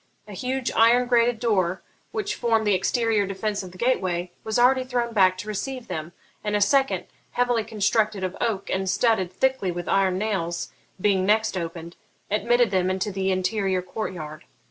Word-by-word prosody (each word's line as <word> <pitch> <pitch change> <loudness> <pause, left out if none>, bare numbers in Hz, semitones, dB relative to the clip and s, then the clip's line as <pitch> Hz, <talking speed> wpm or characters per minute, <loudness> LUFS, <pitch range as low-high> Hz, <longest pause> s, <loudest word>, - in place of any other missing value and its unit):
A 210 - -9
huge 255 +5 -2
iron 240 +2 +4
grated 240 -1 +3
door, 190 -6 0 0.3
which 425 -2 -2
formed 225 -2 +1
the 205 - +3
exterior 210 +2 +1
defence 200 +1 -2
of 185 -2 -9
the 185 - -14
gateway, 185 -7 0
was 220 +1 -1
already 255 +2 +4
thrown 245 -2 -2
back 185 -3 +4
to 205 - -7
receive 250 +4 -4
them; 155 +1 -5 0.3
and 210 -1 -1
a - - +2
second, 270 +7 +2 0.3
heavily 245 -2 +1
constructed 215 -1 0
of 185 0 -3
oak 220 -5 -1
and 190 0 -1
studded 190 -2 +2
thickly 260 0 0
with 175 0 -5
iron 190 -2 +2
nails, 190 -5 -2 0.3
being 190 -1 +2
next 215 +2 +2
opened, 170 -1 -5 0.3
admitted 235 +2 +2
them 185 -1 +1
into 190 +2 -1
the 190 0 -1
interior 190 0 0
court 190 +4 -4
yard. 155 -3 -8
205 Hz, 175 wpm, -24 LUFS, 185-235 Hz, 0.3 s, iron